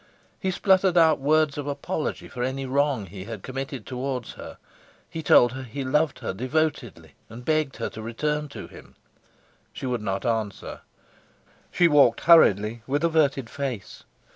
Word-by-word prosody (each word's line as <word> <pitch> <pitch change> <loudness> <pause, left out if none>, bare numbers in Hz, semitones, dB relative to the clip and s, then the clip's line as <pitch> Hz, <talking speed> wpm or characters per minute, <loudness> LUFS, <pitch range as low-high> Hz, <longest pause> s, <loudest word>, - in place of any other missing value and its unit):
He 190 - -1
spluttered 190 -1 +3
out 160 -3 +5
words 150 +1 +2
of 145 - -5
apology 145 +2 -3
for 125 - -7
any 130 +2 -2
wrong 135 -4 0
he 95 +1 -9
had 110 -4 -8
committed 135 -2 -6
towards 130 -1 -4
her; - - -10 0.5
he 165 - -6
told 120 -5 +5
her 130 +1 -6
he 130 +2 -6
loved 150 +3 +1
her - - -2
devotedly 125 - -2 0.2
and 120 +3 -11
begged 155 -3 0
her - - -2
to 110 - -8
return 150 +7 -2
to - - -8
him. - - -15 0.8
She - - -7
would 125 -3 -2
not 95 -2 -3
answer; 110 -4 -3 0.9
she 175 - +4
walked 145 -7 +4
hurriedly, 115 - +5
with 145 +3 -1
averted 150 -6 +2
face. 130 -6 -6
135 Hz, 160 wpm, -25 LUFS, 115-150 Hz, 0.9 s, out